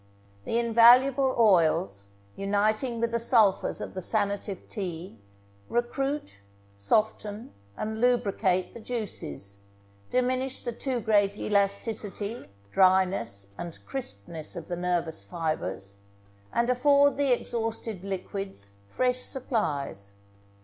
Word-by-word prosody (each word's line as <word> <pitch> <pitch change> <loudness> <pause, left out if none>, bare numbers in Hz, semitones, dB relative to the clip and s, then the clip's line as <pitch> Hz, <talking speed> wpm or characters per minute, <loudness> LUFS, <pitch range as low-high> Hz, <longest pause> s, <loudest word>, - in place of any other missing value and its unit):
The 230 - 0
invaluable 245 +3 +5
oils, 160 - +3 0.3
uniting 215 +5 0
with 230 0 0
the 235 - 0
sulphurs 225 -4 +3
of - - -6
the 185 - -4
sanative 200 -1 -1
tea, 175 - -6 0.5
recruit, 240 - -2 0.3
soften, 210 - -1 0.2
and 220 +1 -3
lubricate 200 -7 +1
the - - -9
juices, 175 - -5 0.5
diminish 255 +1 0
the 240 - -3
too 245 +1 -3
great 205 -2 +2
elasticity, 205 +2 -1 0.2
dryness, 185 - +3
and 170 -1 -6
crispness 160 - -6
of 170 -3 -7
the 175 - -3
nervous 175 - -1
fibres, 100 - -4 0.5
and 235 - +1
afford 280 +2 +4
the 280 -2 +1
exhausted 225 -4 -2
liquids 195 - -5 0.2
fresh 250 - 0
supplies. 145 - -2
205 Hz, 105 wpm, -27 LUFS, 175-240 Hz, 0.5 s, invaluable